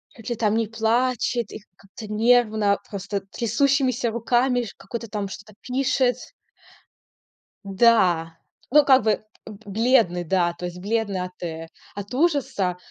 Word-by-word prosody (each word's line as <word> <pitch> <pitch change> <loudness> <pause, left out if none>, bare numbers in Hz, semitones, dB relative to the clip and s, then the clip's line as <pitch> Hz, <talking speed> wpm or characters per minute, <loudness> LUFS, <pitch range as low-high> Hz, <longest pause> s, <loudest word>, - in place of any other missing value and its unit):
чуть 225 -3 -9
ли 240 - -1
там 215 -1 +1
не 225 -1 0
плачет 235 +2 0
и - - -7 0.2
как-то 200 +3 -12
нервно, 215 -2 +3
просто 200 -1 -4
трясущимися 255 +1 +1
руками 245 +2 +1
ш 215 - -7
какой-то, 230 -1 -7
там, 205 -1 -3
что-то 200 +2 -11
пишет. 255 -1 +1 1.5
Да. 185 -6 +3 0.3
Ну, 300 +2 +7
как 265 -5 +5
бы 215 -1 +1 0.2
б 210 - -10
бледный, 215 -4 +2
да. 175 0 +1
То 175 +1 -7
есть 175 0 -6
бледный 205 -1 -1
от 180 0 -8
э 165 -1 -5 0.3
от 205 +3 -7
ужаса. 255 - 0
220 Hz, 140 wpm, -23 LUFS, 195-245 Hz, 1.5 s, Ну